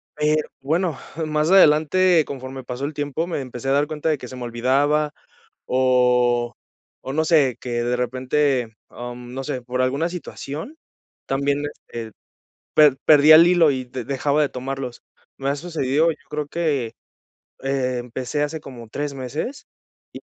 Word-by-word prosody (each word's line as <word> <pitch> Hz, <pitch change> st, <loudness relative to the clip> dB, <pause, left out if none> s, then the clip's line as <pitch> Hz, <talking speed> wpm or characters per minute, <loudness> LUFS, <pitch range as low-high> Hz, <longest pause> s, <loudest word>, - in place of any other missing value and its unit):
Pero 150 Hz, 0 st, +1 dB
bueno, 160 Hz, +2 st, 0 dB, 0.3 s
más 155 Hz, +1 st, 0 dB
adelante, 175 Hz, 0 st, +5 dB
conforme 130 Hz, -1 st, -7 dB
pasó 125 Hz, +2 st, -4 dB
el 150 Hz, -, -4 dB
tiempo, 145 Hz, +3 st, -2 dB
me 175 Hz, -, -2 dB
empecé 125 Hz, 0 st, -5 dB
a -, -, +3 dB
dar 145 Hz, +2 st, +3 dB
cuenta 155 Hz, +1 st, -2 dB
de 155 Hz, -, +1 dB
que 125 Hz, -, -8 dB
se 130 Hz, -, -9 dB
me 125 Hz, -, -6 dB
olvidaba, 140 Hz, +6 st, +1 dB, 0.5 s
o 125 Hz, -2 st, +2 dB, 0.5 s
o 135 Hz, -, -5 dB
no 155 Hz, +1 st, +1 dB
sé, 145 Hz, -7 st, +3 dB
que 120 Hz, -1 st, -2 dB
de 120 Hz, +1 st, 0 dB
repente, 130 Hz, -1 st, 0 dB
am, 120 Hz, 0 st, -8 dB
no 135 Hz, +1 st, -4 dB
sé, 130 Hz, -4 st, -3 dB
por 125 Hz, +1 st, -2 dB
alguna 140 Hz, +6 st, +1 dB
situación 165 Hz, -, -7 dB, 0.5 s
también 140 Hz, +1 st, 0 dB, 0.3 s
este, 115 Hz, -2 st, -6 dB, 0.6 s
per 150 Hz, -3 st, +6 dB
perdía 155 Hz, +1 st, +8 dB
el 165 Hz, +2 st, +8 dB
hilo 175 Hz, -4 st, +5 dB
y 130 Hz, -2 st, -3 dB
de 125 Hz, 0 st, -6 dB
dejaba 140 Hz, +2 st, +1 dB
de 145 Hz, -, +1 dB
tomarlos. 130 Hz, -1 st, -5 dB, 0.3 s
Me 135 Hz, -, -4 dB
ha 140 Hz, -, 0 dB
sucedido, 155 Hz, -1 st, +1 dB
yo 155 Hz, -, -8 dB
creo 150 Hz, -1 st, -3 dB
que, 145 Hz, -8 st, -1 dB, 0.7 s
eh, 135 Hz, -2 st, -1 dB
empecé 125 Hz, +4 st, -3 dB
hace 155 Hz, +2 st, -4 dB
como 125 Hz, -5 st, -10 dB
3 145 Hz, +4 st, -4 dB
meses, 150 Hz, -, -5 dB, 0.5 s
y -, -, -9 dB
140 Hz, 160 wpm, -22 LUFS, 125-150 Hz, 0.7 s, perdía